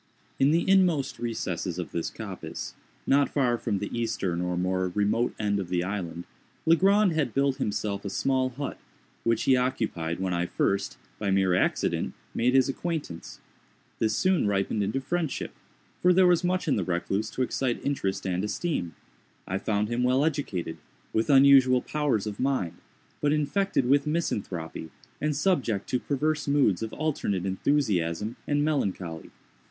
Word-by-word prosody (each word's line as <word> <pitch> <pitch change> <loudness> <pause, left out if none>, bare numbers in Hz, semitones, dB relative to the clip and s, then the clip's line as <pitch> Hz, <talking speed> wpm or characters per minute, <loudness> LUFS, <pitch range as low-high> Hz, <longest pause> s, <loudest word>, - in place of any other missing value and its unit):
In 135 - +5
the 165 +3 +2
inmost 180 -7 +3
recesses 110 -6 -3
of 90 - -5
this 85 - -2
coppice, - - -7 0.3
not 140 +1 +3
far 125 -4 +2
from 105 -4 -1
the 105 +4 -4
eastern 100 -7 -1
or 90 0 -1
more 95 +1 0
remote 105 +4 +1
end 100 -1 0
of 95 -3 -4
the 90 -1 0
island, 90 -3 -4 0.4
Legrand 195 +4 +5
had 155 -3 -1
built 140 -1 +2
himself 100 -1 -2
a 100 - -3
small 130 +5 +1
hut, 135 +3 -5 0.4
which 115 -1 +1
he 130 - +5
occupied 110 -11 -1
when 95 -1 -1
I 85 0 0
first, 100 +2 -1 0.2
by 100 - -1
mere 95 -1 +3
accident, 90 - 0 0.2
made 125 +3 +2
his 130 -1 +5
acquaintance. 145 - -4 0.6
This 110 -1 +1
soon 185 - +2
ripened 100 +1 0
into 105 +6 0
friendship—for 170 +3 -2
there 185 +1 +5
was 180 0 +4
much 180 0 0
in 145 - +2
the 100 - 0
recluse 95 +4 -1
to 130 - -1
excite 125 0 -1
interest 100 -9 -1
and 90 0 -1
esteem. 105 - -2 0.5
I 95 +1 -1
found 105 0 0
him 120 +2 -1
well 130 +3 +3
educated, 95 - -2 0.4
with 110 - +1
unusual 135 -2 +6
powers 145 -9 0
of 105 -2 -5
mind, 125 -11 -1 0.4
but 145 - +2
infected 155 0 +1
with 140 +2 +3
misanthropy, 95 - -3 0.3
and 150 0 0
subject 140 - 0
to 125 - +1
perverse 150 +3 -1
moods 140 -10 +3
of 110 -1 -3
alternate 120 - -1
enthusiasm 100 - 0
and 145 0 +2
melancholy. 95 - -2
120 Hz, 160 wpm, -27 LUFS, 95-145 Hz, 0.6 s, unusual